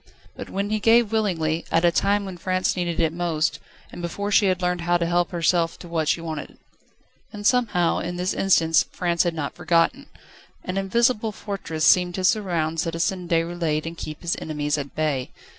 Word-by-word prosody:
But - - -8
when 200 +2 -2
he 215 - +1
gave 225 0 +4
willingly, 170 -7 0
at 165 +1 +3
a 170 - +5
time 200 +4 +1
when 190 -2 -6
France 185 +1 0
needed 175 -2 -2
it 160 -1 +1
most, 160 -3 -1 0.3
and - - -8
before 200 +4 -3
she 205 0 +4
had 185 -1 +1
learned 180 -1 -1
how 175 +1 +2
to 170 - -1
help 175 0 +1
herself 170 -1 +1
to 175 - -11
what 165 -2 -1
she 165 - +2
wanted. 160 -3 -6 0.7
And 205 -1 -8
somehow, 210 -9 +2
in 175 +1 -4
this 180 +1 -1
instance, 165 -4 +3
France 170 -2 0
had 175 -2 0
not 145 -3 -3
forgotten: 175 +10 +1 0.6
an 185 +1 -4
invisible 225 +3 +1
fortress 195 -7 -4
seemed 180 -1 +4
to 185 - -3
surround 170 -6 +1
Citizen 175 +2 -1
Déroulède 165 -2 0
and 165 +1 -5
keep 155 -2 -7
his 170 - 0
enemies 150 -1 -2
at 140 -2 -6
bay. 150 -5 -1
175 Hz, 190 wpm, -23 LUFS, 165-195 Hz, 0.7 s, a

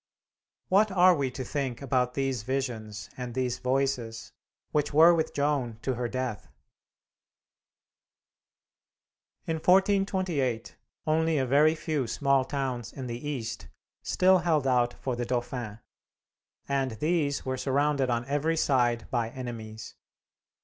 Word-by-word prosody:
What 200 +2 +4
are 185 0 +6
we 140 -5 0
to 130 +1 -6
think 135 -3 -3
about 125 -2 0
these 135 -4 -1
visions 115 -4 -4
and 125 -2 -6
these 125 -2 -1
Voices 130 -3 -1 0.4
which 150 -1 0
were 165 +3 +8
with 160 -2 0
Joan 140 -6 0
to 130 - 0
her 120 0 -2
death? 130 -4 -4 3.0
In 160 - -1
1428 185 - +1 0.3
only 160 0 +2
a 135 - +1
very 150 +5 +4
few 155 -5 -2
small 140 +3 +2
towns 130 -5 -3
in 135 - -7
the 125 +4 -5
east 115 -6 -5 0.3
still 185 0 +4
held 160 -5 +1
out 125 -2 +2
for 130 -2 -3
the 120 - -2
Dauphin, 120 -3 -3 0.9
and 135 -2 0
these 150 +3 0
were 130 0 -1
surrounded 140 0 +1
on 120 0 0
every 145 +4 0
side 120 -6 +1
by 120 -3 0
enemies. 115 -3 -7
135 Hz, 130 wpm, -28 LUFS, 120-150 Hz, 3.0 s, were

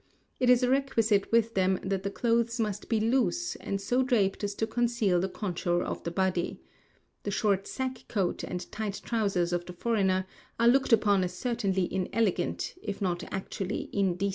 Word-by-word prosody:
It 250 - +3
is 250 0 +6
a - - +4
requisite 225 -7 +2
with 230 0 +3
them 190 -1 +2
that 190 0 -1
the 200 - -2
clothes 235 +2 +1
must 210 -2 -2
be 225 - +2
loose, 265 +10 +1
and 200 - -3
so 245 +6 +1
draped 220 -7 +1
as 200 0 -2
to 220 - 0
conceal 230 -5 +1
the 190 +2 -1
contour 175 -3 -1
of - - -4
the - - -2
body. 185 0 -1 0.6
The - - -4
short 200 -2 +1
sack 260 -2 -4
coat 195 -5 -1
and 180 0 -5
tight 210 -2 -3
trousers 195 -7 0
of 175 0 -2
the 180 - -7
foreigner 190 -2 +1 0.3
are 235 - +4
looked 265 +2 +4
upon 205 -4 +4
as 180 - -3
certainly 200 -7 0
inelegant, 190 +2 0
if 200 -2 -4
not 175 -3 -1
actually 190 0 -4
indecent. 195 0 +1
205 Hz, 180 wpm, -29 LUFS, 190-235 Hz, 0.6 s, is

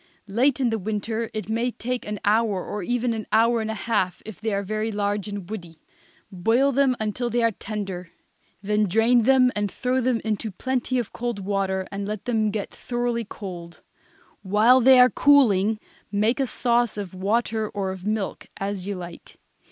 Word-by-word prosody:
Late 245 +6 +2
in 250 -3 +2
the 225 - -1
winter 220 +3 -3
it 215 -1 -5
may 230 +3 0
take 245 0 -4
an 210 -1 -4
hour 210 -2 +2
or 210 - -4
even 245 +4 0
an 220 -2 -5
hour 230 +1 +4
and 220 - -3
a 220 - -2
half 205 -6 -1
if 215 -2 -10
they 220 0 -1
are 200 0 -1
very 215 +2 -2
large 205 0 -1
and 200 -3 -6
woody. 175 -6 -8 0.5
Boil 225 +9 +2
them 270 -1 +3
until 220 +3 -2
they 240 0 +1
are 230 - +3
tender. 195 -4 -5 0.5
Then 210 +1 +2
drain 225 +4 +3
them 255 -1 +5
and 205 -1 0
throw 255 +5 -1
them 245 -1 +1
into 220 0 -1
plenty 255 +5 -2
of 240 -4 -3
cold 240 -4 -3
water, 190 -1 -1
and 200 0 -4
let 210 -1 -5
them 220 -3 +1
get 205 -1 -4
thoroughly 240 -1 -2
cold. 175 -4 -9 0.6
While 215 +6 +5
they 260 +1 +7
are 250 0 +7
cooling 220 -7 +4 0.3
make 215 +6 +1
a 270 - +1
sauce 240 -1 +1
of 200 -3 -5
water 215 +3 0
or 195 -2 -3
of 190 -1 -8
milk, 210 -1 -3
as 195 -1 -3
you 200 - -2
like. 175 -1 -10
215 Hz, 185 wpm, -24 LUFS, 200-240 Hz, 0.6 s, they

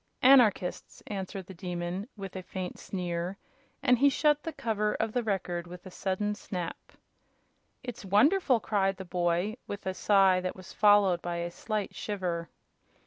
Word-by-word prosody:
"Anarchists!" 245 -8 +4
answered 195 -1 -5
the 190 - -10
Demon, 180 +3 -4
with 195 -2 -7
a 185 - -4
faint 185 0 -6
sneer, 180 0 -3 0.5
and 250 -3 +4
he 280 +2 +6
shut 295 +2 +2
the 325 - -4
cover 215 -6 -1
of 220 -1 -1
the 245 - +1
Record 180 -5 -2
with 175 +1 -10
a 185 - -9
sudden 195 +3 -1
snap. 180 -4 -6 0.9
"It's 245 -4 -7
wonderful!" 250 - +4
cried 195 -3 0
the 190 - -7
boy, 175 +4 0
with 205 0 -6
a 190 - -1
sigh 195 -1 +4
that 185 0 -3
was 185 -1 -11
followed 205 -4 +5
by 175 0 -3
a 170 0 -3
slight 210 +2 -3
shiver. 175 -5 -3
195 Hz, 160 wpm, -29 LUFS, 180-215 Hz, 0.9 s, he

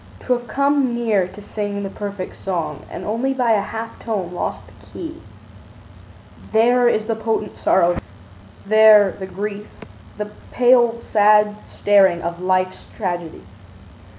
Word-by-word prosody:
To 255 - 0
have 240 0 -4
come 280 -1 +1
near 215 -6 +1
to 190 +3 -12
sing 205 -1 -4
the 195 - -4
perfect 200 -3 -6
song 165 -6 -4
And - - -7
only 245 +5 -1
by 245 -3 +1
a 210 -2 +3
half 225 +2 -7
tone 195 -6 -3
lost - - -4
the - - -19
key, 330 -1 -8 1.3
There 240 +2 +4
is 215 -2 0
the 225 0 -1
potent 220 -1 -2
sorrow, 175 -1 +2 0.7
there 215 -1 +6
the 190 +1 -8
grief, 205 +2 -5 0.5
The 210 0 -5 0.2
pale, 240 -2 +4
sad 210 0 +4
staring 190 -4 +3
of 170 +1 -4
life's 185 0 0 0.2
tragedy. 175 - -4
210 Hz, 140 wpm, -20 LUFS, 190-235 Hz, 1.3 s, there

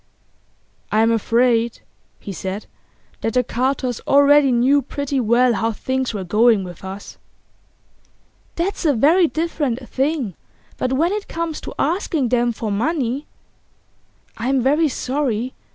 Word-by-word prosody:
'I'm 225 +2 +3
afraid,' 230 +1 +1 0.4
he 200 - -7
said, 190 +4 -5 0.6
'that 225 - -2
the 250 - +4
Carters 255 0 -1
already 285 0 +5
knew 260 +4 +3
pretty 280 +1 -3
well 240 +1 +3
how 225 +1 0
things 260 +3 -2
were 205 -4 -4
going 215 +2 +3
with 180 -1 -10
us.' 190 +2 -8 1.4
'That's 370 +4 -2
a 295 -5 +3
very 325 +9 +4
different 295 -7 -2
thing. 270 - -1 0.5
But 255 - -1
when 325 +7 +2
it 420 0 -3
comes 330 -1 -4
to - - -8
asking 320 - 0
them 240 0 +2
for 220 -2 -4
money 265 +4 -1 0.5
' - - -39
'I'm 255 +2 +1
very 300 +5 +3
sorry. 255 -3 -2
255 Hz, 135 wpm, -20 LUFS, 230-290 Hz, 1.4 s, already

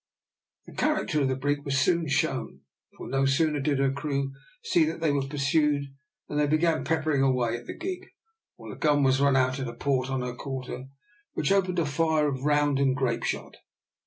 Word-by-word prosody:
The - - -13
character 300 - 0
of 135 - +2
the 130 - 0
brig 145 +2 -1
was 140 -1 -1
soon 170 +2 +2
shown, 135 - -1 0.4
for - - -8
no 135 +1 +1
sooner 150 +2 +2
did 140 0 0
her 135 0 +2
crew 140 -1 -2 0.3
see 175 - +3
that 160 +1 -3
they 160 -2 +1
were 140 -1 0
pursued 140 0 +1 0.3
than 150 - -2
they 150 - +3
began 155 +2 +2
peppering 155 -3 +1
away 125 -4 +2
at 120 - -9
the - - -7
gig, 370 +2 -5 0.5
while - - -10
a - - -9
gun 145 -2 +2
was 135 0 +3
run 140 -1 +4
out 130 0 +2
at 130 - -3
a 120 - -7
port 130 -1 0
on 130 -1 -1
her 125 -1 -3
quarter, 130 0 -6 0.5
which - - 0
opened 185 -2 +2
a 170 - +2
fire 155 +1 +1
of 135 -3 -3
round 145 -1 +2
and 135 -2 +2
grape 130 -3 0
shot. - - -4
140 Hz, 205 wpm, -27 LUFS, 135-155 Hz, 0.5 s, run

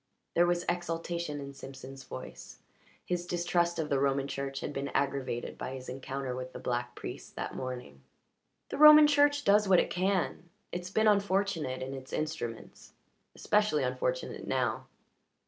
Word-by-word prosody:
There 175 +1 +4
was 175 0 0
exultation 170 -3 -2
in 140 0 -7
Simpson's 135 0 -10
voice. - - -9 0.5
His 175 -1 -2
distrust 175 0 +1
of 155 -2 -2
the 140 - +2
Roman 140 0 +1
Church 135 0 -4
had - - -4
been 140 0 -3
aggravated 135 -4 -1
by 130 - -4
his 130 -1 -8
encounter 135 0 -4
with 130 0 -6
the - - -7
black 120 0 -2
priest - - -8
that - - -4
morning. 125 - -6 0.7
"The - - -5
Roman 305 0 +10
Church 290 0 +4
does 210 -1 +4
what 185 -2 +7
it - - 0
can. 185 -2 0 0.2
It's 180 0 -4
been 220 +3 +2
unfortunate 195 -10 +1
in 135 +1 -5
its 130 -1 -9
instruments. 155 -7 -5 0.4
Especially 210 -9 +2
unfortunate 125 0 -2
now." 125 -4 -1
145 Hz, 155 wpm, -31 LUFS, 130-180 Hz, 0.7 s, Roman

